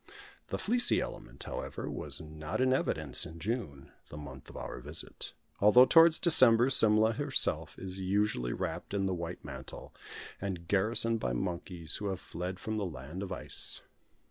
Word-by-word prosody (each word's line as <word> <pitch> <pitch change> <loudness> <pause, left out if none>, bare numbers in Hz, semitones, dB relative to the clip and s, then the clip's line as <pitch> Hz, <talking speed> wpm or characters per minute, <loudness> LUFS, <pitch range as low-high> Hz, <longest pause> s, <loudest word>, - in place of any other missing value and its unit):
The - - -3
fleecy 245 +3 +3
element, - - -7
however, - - -6
was 75 -1 -4
not 75 +2 -6
in 130 0 +3
evidence 75 - +3
in 80 - -5
June, 85 - -4 0.2
the 75 - -9
month 70 -3 -10
of - - -10
our - - -6
visit, 75 +5 -3 0.3
although 105 +5 +7
towards 165 +2 +6
December 130 -6 +6
Simla 110 -2 +4
herself - - -1
is 95 0 -6
usually 95 -10 0
wrapt - - -4
in 100 -1 0
the 95 - 0
white 85 0 -6
mantle, 65 0 -9 0.5
and 90 -4 -5
garrisoned 115 +4 +1
by - - -2
monkeys, 85 +3 -3
who 105 - -4
have 95 -2 -3
fled 90 +2 -6
from 110 0 -4
the 105 - -1
land 75 +3 -8
of 100 -1 -5
ice. 90 - -4
95 Hz, 165 wpm, -31 LUFS, 80-110 Hz, 0.5 s, although